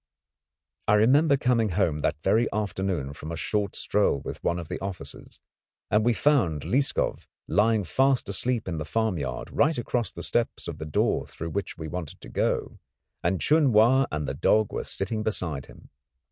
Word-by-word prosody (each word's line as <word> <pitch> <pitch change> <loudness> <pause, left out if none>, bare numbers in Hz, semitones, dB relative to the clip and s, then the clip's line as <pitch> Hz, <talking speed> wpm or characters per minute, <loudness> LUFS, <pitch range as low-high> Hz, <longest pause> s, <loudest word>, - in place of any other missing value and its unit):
I 105 - +5
remember 140 +7 +4
coming 120 -4 +2
home 85 -5 +1
that 75 - -1
very 115 +1 +2
afternoon 95 -8 -2
from 75 +2 -8
a - - -3
short 100 +6 -1
stroll 105 -8 +1
with - - -7
one 85 - +1
of 85 -2 -6
the - - -4
officers, 95 -2 -7 0.5
and 105 +1 +4
we 120 - +4
found 110 - +2
Lieskov 135 +2 0 0.2
lying 105 +4 +3
fast 130 +8 +2
asleep 115 +3 -1
in 85 -4 -3
the - - -2
farmyard 80 - -2
right 155 +2 +2
across 120 -4 -1
the 85 - -7
steps 120 -1 -1
of 80 -2 -6
the 80 - -5
door 75 - 0
through 80 0 -6
which 100 0 -4
we 80 -1 -6
wanted 85 -1 -6
to - - -10
go, - - -1 0.4
and 90 +2 0
Chun 150 -5 +4
Wa 125 +5 +5
and 75 -1 -2
the 65 - -2
dog 105 +9 +2
were - - -2
sitting 110 +3 -2
beside 85 -10 -2
him. - - -16
100 Hz, 180 wpm, -26 LUFS, 80-120 Hz, 0.5 s, I